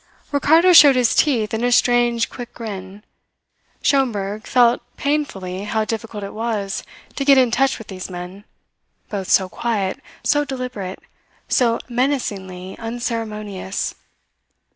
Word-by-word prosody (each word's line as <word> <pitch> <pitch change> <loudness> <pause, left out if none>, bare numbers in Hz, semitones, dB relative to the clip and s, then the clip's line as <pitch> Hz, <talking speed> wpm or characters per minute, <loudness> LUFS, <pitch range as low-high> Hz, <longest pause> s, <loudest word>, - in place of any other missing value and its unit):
Ricardo 320 +5 +5
showed 290 -5 +9
his 250 -2 +3
teeth 230 -9 +2
in 220 +1 -1
a 245 - +2
strange, 240 -1 +3
quick 245 -1 -9
grin. 200 -3 -7 0.8
Schomberg 215 -7 0
felt 245 -1 +4 0.2
painfully 200 -11 -2
how 215 +1 0
difficult 220 -2 -5
it 200 - -6
was 215 -3 -2 0.3
to 275 - -1
get 275 -1 +6
in 250 -3 +4
touch 270 +3 +2
with 225 - -10
these 190 -2 -7
men, 180 +2 -8 0.7
both 195 -3 -4
so 190 - +4
quiet, 200 -1 -2 0.2
so 290 0 +2
deliberate, 250 -9 -5 0.5
so 235 -2 +2
menacingly 205 -8 -2
unceremonious. 220 -4 -4
230 Hz, 125 wpm, -20 LUFS, 200-250 Hz, 0.8 s, showed